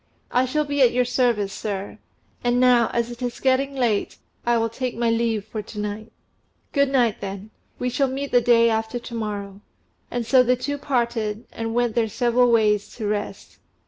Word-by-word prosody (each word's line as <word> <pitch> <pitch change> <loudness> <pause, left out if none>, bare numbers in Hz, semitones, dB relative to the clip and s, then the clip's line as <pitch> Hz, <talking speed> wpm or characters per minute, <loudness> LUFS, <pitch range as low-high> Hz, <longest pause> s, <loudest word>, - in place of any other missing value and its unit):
"I 250 +1 +3
shall 300 +4 0
be 285 -1 -1
at 250 - +5
your 250 0 +2
service, 235 -5 +1
sir. 200 -2 -5 0.4
And 245 0 +2
now, 245 -2 +5
as 235 0 -1
it 240 +1 -10
is 245 -1 -3
getting 270 +1 +1
late, 235 -6 0 0.3
I 240 0 +4
will 225 0 +1
take 245 +1 -4
my 235 -1 +1
leave 225 -3 0
for 220 0 -5
to 210 0 -9
night." 210 +2 -5 0.6
"Good 280 -2 +2
night, 245 -5 +1
then. 200 +1 -6 0.3
We 250 0 -2
shall 275 +2 +1
meet 275 +2 -4
the 245 - +5
day 235 -1 +5
after 220 +1 -1
to 240 0 -9
morrow." 205 -3 -5 0.5
And 240 -1 -3
so 255 +2 +5
the 250 0 +3
two 285 +3 -4
parted, 235 -5 -1
and 225 0 -4
went 240 -2 +1
their 230 -1 +1
several 245 +2 +2
ways 210 -3 +2
to 220 - -5
rest. 205 0 -4
235 Hz, 195 wpm, -23 LUFS, 215-250 Hz, 0.6 s, at